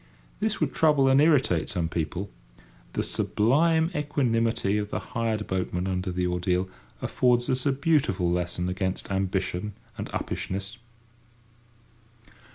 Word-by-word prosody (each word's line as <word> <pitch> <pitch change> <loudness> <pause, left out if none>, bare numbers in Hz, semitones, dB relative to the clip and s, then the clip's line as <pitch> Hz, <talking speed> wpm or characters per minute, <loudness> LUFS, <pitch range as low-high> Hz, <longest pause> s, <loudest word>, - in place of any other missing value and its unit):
This - - 0
would - - 0
trouble 150 -4 +4
and 135 +1 +5
irritate 135 - +3
some 85 -2 -1
people; 85 +4 -3 0.6
the - - 0
sublime 160 - +2
equanimity 115 - +1
of 105 0 -3
the - - -2
hired 110 -2 -2
boatman 90 -1 -2
under 95 0 -2
the 90 0 -1
ordeal 90 +1 0 0.4
affords 120 -1 +2
us 130 +1 0
a - - +4
beautiful 135 - +1
lesson 90 0 -1
against 95 +1 -2
ambition 95 +1 -1 0.3
and - - -4
uppishness. 100 +4 -4
105 Hz, 125 wpm, -27 LUFS, 90-130 Hz, 0.6 s, and